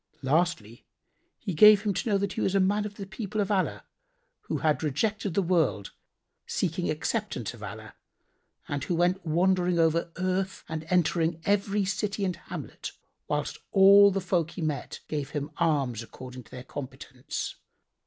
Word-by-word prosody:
Lastly 145 -6 0 0.5
he 190 - -4
gave 210 +4 +8
him 205 -2 +1
to 230 - -2
know 200 - +3
that 195 -1 -2
he - - -3
was 195 - +1
a - - +5
man 205 +2 +2
of 205 - -12
the 200 - -6
people 200 +2 -5
of 200 - +1
Allah[FN#85] 195 -3 0 0.7
who - - -1
had 155 -2 +1
rejected 195 - -1
the 200 - +3
world 160 - +1 0.6
seeking - - -1
acceptance - - -2
of - - -13
Allah - - -8 0.7
and 145 -1 -3
who 175 - -1
went 180 +3 +1
wandering 180 +2 +2
over 165 +1 +2
earth 185 +1 -1
and 160 0 -5
entering 170 -1 +2
every 200 0 +1
city 200 +1 -1
and 180 -2 -1
hamlet, 170 - -7 0.3
whilst - - -2
all 200 +1 +8
the 195 0 -1
folk 170 -3 0
he 175 - -7
met 150 -2 -3
gave 145 -2 -3
him 145 0 -4
alms 140 -9 +1
according 125 +1 -10
to - - -19
their 125 - -8
competence. 130 -1 -6
175 Hz, 165 wpm, -28 LUFS, 155-195 Hz, 0.7 s, gave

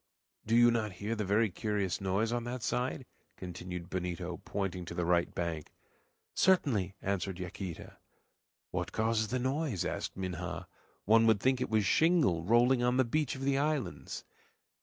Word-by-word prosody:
"Do 115 - +3
you 120 0 +7
not 110 -4 -1
hear 100 +4 -5
a - - -1
very 105 +1 +2
curious 100 -2 -1
noise 100 +4 0
on 120 0 -1
that 120 -1 -4
side?" 125 +1 -1 0.3
continued 90 -1 -6
Benito, 90 -1 -3
pointing 95 -3 -2
to - - -7
the 90 - 0
right 85 0 +2
bank. 85 -3 -3 0.6
"Certainly," 115 - +2
answered 95 -2 -1
Yaquita. 90 -1 -6 0.7
"What - - -3
causes 110 0 +1
the 130 - -1
noise?" 130 - -1
asked - - -3
Minha. 90 -3 -4 0.4
"One 115 +2 +5
would 110 -2 +4
think 130 +3 +2
it - - -1
was 110 -2 +2
shingle 155 - +3
rolling 120 +5 +4
on 125 +1 +2
the 130 - +4
beach 150 +3 0
of 135 - -6
the 135 0 +2
islands." 150 -2 -2
110 Hz, 160 wpm, -32 LUFS, 90-125 Hz, 0.7 s, you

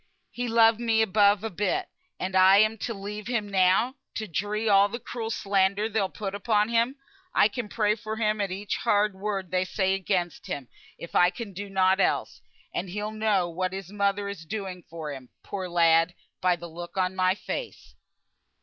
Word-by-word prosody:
He 245 0 -3
loved 225 -1 +5
me 225 -2 +2
above 205 -1 +3
a 225 - -3
bit; 210 - -1 0.3
and 190 +1 -3
am 195 +3 +6
I - - -11
to 230 - -3
leave 205 +1 -6
him 235 -4 -1
now 195 +7 +2 0.2
to 220 - -3
dree 205 +5 -2
all 200 0 +5
the 235 - -4
cruel 230 -1 -5
slander 200 0 +1
they'll 210 -3 0
put 195 -1 -5
upon 210 +1 +1
him? 235 +3 +2 0.4
I - - +6
can 215 0 -5
pray 210 -1 +2
for 220 0 -5
him 215 -1 0
at 200 - -1
each 195 +3 -3
hard 210 0 +2
word 195 -2 -4
they 185 0 +2
say 190 0 0
against 185 -3 -2
him, 135 -4 -5 0.3
if 170 - -10
I 180 - +5
can 200 +1 -7
do 200 +2 -6
nought 190 0 +3
else; - - 0 0.3
and 185 - -3
he'll 210 +3 -3
know 215 -4 +1
what 185 +2 -3
his 195 -1 -6
mother 200 0 0
is 200 -4 -6
doing 190 0 -5
for 160 -3 -6
him, 130 -2 -10
poor 190 -2 -5
lad, 165 0 +4 0.3
by 180 -1 +3
the 175 - -10
look 175 +3 -9
on 185 0 0
my 185 0 +2
face." 475 - -6
200 Hz, 195 wpm, -27 LUFS, 185-215 Hz, 0.4 s, am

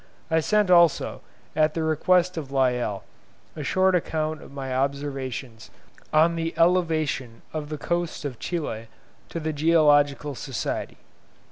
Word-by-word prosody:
I 160 - +4
sent 210 +3 +2
also, 170 -3 +4 0.3
at 155 0 +2
the 165 - -1
request 180 +3 +2
of 145 -5 -6
Lyell, 125 -7 0 0.5
a 150 - -5
short 185 +6 +2
account 155 -3 -1
of - - -13
my 135 -2 -5
observations 135 -4 -3 0.4
on 165 +2 +4
the 165 0 -3
elevation 160 -9 +1
of 150 -2 -4
the 155 - -4
coast 170 0 -2
of 130 -5 -5
Chile 130 -10 -4 0.4
to 165 - -4
the 155 0 -2
Geological 145 -2 +3
Society. 135 -3 -4
155 Hz, 135 wpm, -25 LUFS, 135-165 Hz, 0.5 s, I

